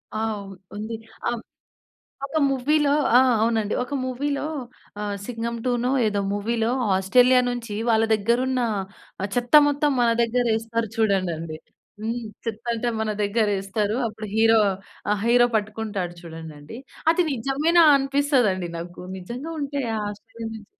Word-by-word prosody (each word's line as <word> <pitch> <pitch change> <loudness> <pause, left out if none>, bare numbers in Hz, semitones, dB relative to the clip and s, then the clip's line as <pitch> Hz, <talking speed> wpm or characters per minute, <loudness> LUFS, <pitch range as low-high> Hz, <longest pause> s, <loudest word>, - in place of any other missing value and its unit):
ఆ! - - -1 0.2
ఉ - - -8 0.3
ఉంది. 220 +2 -4 0.3
ఆహ్, 240 -1 -3 0.9
ఒక 315 - -2
మూవీ‌లో 285 +2 +2 0.2
ఆ! - - +8 0.2
అవునండి. 225 -2 +1
ఒక 270 - -11
మూవీ‌లో 280 +3 -2 0.6
ఆహ్, 205 -1 -2
'సింగం 235 -1 -3
2' 245 - +2
నో 255 - +2 0.2
ఏదో 205 -1 0
మూవీ‌లో 225 +2 0 0.3
ఆస్ట్రేలియా 250 +6 +5
నుంచి 235 -4 -4
వాళ్ళ 225 0 +4
దగ్గర 230 +3 +1
ఉన్న 255 -1 0 0.6
ఆహ్, 200 - -2
చెత్త 245 +3 -2 0.2
మొత్తం 290 0 +1
మన 235 - +4
దగ్గర 245 +1 0
ఎస్తారు 230 -1 -3
చూడండండి. 175 -7 0 0.4
హ్మ్. 230 +2 -3 0.2
చెత్త 225 0 -4
అంటే 235 +1 -1
మన 215 -1 -1
దగ్గర 215 +1 +1
ఎస్తరు. 210 +2 -1
అప్పుడు 215 0 -7
హీరో 225 0 +5 0.5
ఆహ్, 205 -1 0
హీరో 240 0 +5
పట్టుకుంటాడు 210 -4 -4
చూడండండి. 160 +3 -9 0.3
అది 360 - +2
నిజమేనా 285 +7 +3
అనిపిస్తదండి 270 - +1
నాకు. 175 +1 -9 0.2
నిజంగా 245 - -6
ఉంటయ 280 -3 -2 0.2
ఆస్ట్రేలియా 225 +2 -8
నుంచి 210 -2 -10
225 Hz, 140 wpm, -24 LUFS, 205-250 Hz, 0.9 s, ఆ